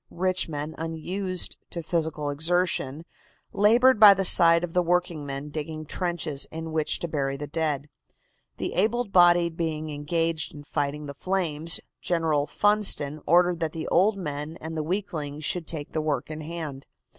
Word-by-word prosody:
Rich 185 0 0
men, 150 +1 -5
unused 180 +3 -2
to 170 - -5
physical 155 -3 -2
exertion, 160 -1 -1 0.5
labored 235 +4 +4
by 205 -2 +9
the 195 0 -1
side 170 -1 +7
of 170 -2 -4
the 180 - +3
workingmen 155 -5 -2
digging 155 +1 -5
trenches 160 -4 -2
in 160 0 -6
which 155 -1 +1
to 170 - -2
bury 140 -3 -2
the 145 - -5
dead. 150 -2 -2 0.7
The - - -3
able 230 +6 +1
bodied 175 -3 +4
being 155 -2 -3
engaged 160 +2 -1
in 145 - -10
fighting 145 0 -3
the 140 - -7
flames, 165 -1 0 0.2
General 160 -4 0
Funston 200 -8 +2
ordered 175 +1 +4
that 160 -2 -2
the 160 -1 -5
old 195 +4 +3
men 150 -2 -5
and 160 +1 -7
the 155 - -1
weaklings 155 -4 -4
should 170 0 0
take 150 -3 -4
the 155 - -1
work 155 0 -2
in 155 0 -6
hand. 155 -4 -7
160 Hz, 160 wpm, -26 LUFS, 150-180 Hz, 0.7 s, by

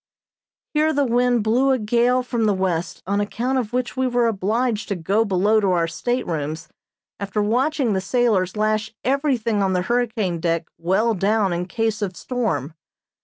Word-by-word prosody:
Here 310 +1 +2
the 285 -1 +2
wind 245 -1 +2
blew 245 +5 +2
a 265 - +3
gale 240 +3 +2
from 235 -2 -1
the 205 -2 +2
west, 180 -2 -2
on 200 +2 0
account 245 +5 -1
of 230 -3 -4
which 250 0 -2
we 260 0 +1
were 245 -1 +1
obliged 225 +2 0
to 200 - -2
go 195 +6 +1
below 205 +2 +2
to 200 -2 +1
our 170 -2 +1
staterooms 165 - -3 0.5
after 200 +1 -3
watching 245 +3 +1
the 190 - 0
sailors 210 -3 +1
lash 215 +1 0
everything 255 -6 +1
on 190 -1 +1
the 180 -1 0
hurricane 220 -6 -1
deck 165 0 0
well 195 +7 +1
down 200 0 +1
in 175 +1 -3
case 220 +1 -1
of 190 -3 -3
storm. 185 - -2
215 Hz, 170 wpm, -22 LUFS, 190-245 Hz, 0.5 s, a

